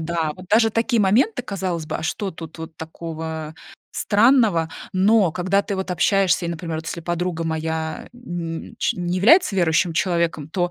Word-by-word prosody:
да. 160 -1 -1
Вот 185 +2 -12
даже 225 +1 +4
такие 230 +1 +1
моменты, 240 - +2
казалось 185 -7 -3
бы, - - -3
а - - -7
что 195 +5 -2
тут 165 -1 -10
вот 160 0 -8
такого, 160 -1 -6
а, - - -15 0.4
странного? 210 -7 +3 0.2
Но 195 0 +4
когда 190 +4 +1
ты 200 - -4
вот 190 0 -4
общаешься 185 0 +2
и, - - -3
например 165 -1 -4
вот, 160 - -8
если 170 - -4
подруга 175 0 -2
моя, 160 0 -3
э, - - -14
н 175 -8 -5
не 230 - -15
ч - - 0
не 175 0 -2
является 240 - +5
верующим 170 -1 +2
человеком, 165 -3 0
то 175 0 -1
175 Hz, 190 wpm, -22 LUFS, 160-200 Hz, 0.4 s, является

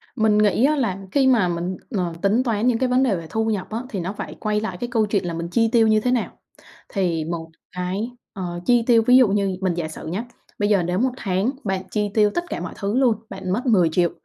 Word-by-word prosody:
Mình 220 -3 +3
nghĩ 210 +4 +3
á 305 +2 +3
là 225 -10 -1
khi 270 -2 +3
mà 235 -8 +4
mình, 175 +1 -3 0.2
ờ, 180 -3 -1
tính 210 +5 +2
toán 230 -2 0
những 245 -2 +3
cái 255 +1 0
vấn 250 +1 +3
đề 235 -7 +2
về 165 -2 -6
thu 220 +5 -1
nhập 210 -4 -2
á 220 - -3
thì 200 - -4
nó 180 +3 -3
phải - - -6
quay 210 0 0
lại 190 -5 -4
cái 240 - -4
câu 225 -3 +2
chuyện 205 -2 -1
là 170 - -3
mình 165 +1 -4
chi 225 +3 +2
tiêu 230 -2 +4
như 215 0 +4
thế 250 +3 0
nào. 245 -3 0 0.6
Thì 175 -5 -1
một 165 0 -5 0.2
cái, 185 +6 -3 0.2
ờ, 175 -3 -5
chi 240 -1 +4
tiêu 230 -2 +6
ví 250 +1 +7
dụ 255 -4 +6
như 195 -2 0
mình 185 -2 +1
giả 170 -2 -3
sử 160 - -9
nhá, 185 +8 -3 0.4
bây 205 0 +1
giờ 195 -4 +3
nếu 180 +2 -1
một 255 +2 +2
tháng 195 +3 0
bạn 190 -2 -2
chi 210 -1 0
tiêu 210 -1 +4
tất 345 - 0
cả - - -3
mọi - - -6
thứ 205 +3 -1
luôn, 250 -4 +4
bạn 190 -2 -5
mất 240 +7 -2
10.000.000 175 -6 +3
205 Hz, 260 wpm, -22 LUFS, 180-230 Hz, 0.6 s, ví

